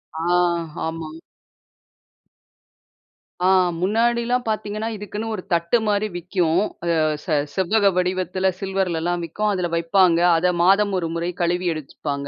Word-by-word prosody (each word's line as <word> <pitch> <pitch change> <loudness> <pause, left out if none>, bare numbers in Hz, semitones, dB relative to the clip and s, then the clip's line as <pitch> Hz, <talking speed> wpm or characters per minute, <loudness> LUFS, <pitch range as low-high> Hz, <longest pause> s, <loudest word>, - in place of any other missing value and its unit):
ஆ, - - -4 0.6
ஆமா. 160 -1 -4 2.3
ஆ - - +5 0.3
முன்னாடிலாம் 235 +5 +1
பாத்தீங்கன்னா, 215 0 -2
இதுக்குன்னு 210 +2 -6
ஒரு 190 - -4
தட்டு 170 +7 +2
மாரி 210 +1 +1
விக்கும். 175 0 0 0.6
ச - - -19
ச 160 -4 0 0.2
செவ்வக 200 +2 +2
வடிவத்தில 185 +1 0
சில்வர்லலாம் 175 -3 -1
விக்கும். 210 +6 -2
அதில 180 -2 -1
வைப்பாங்க. 170 +1 +3 0.2
அதை 180 +2 +2
மாதம் 200 +2 +4
ஒரு 170 -2 -1
முறை 170 +1 -2
கழுவி 175 +1 0
எடுத்துப்பாங்க. 140 -1 -5
185 Hz, 115 wpm, -22 LUFS, 170-210 Hz, 2.3 s, ஆ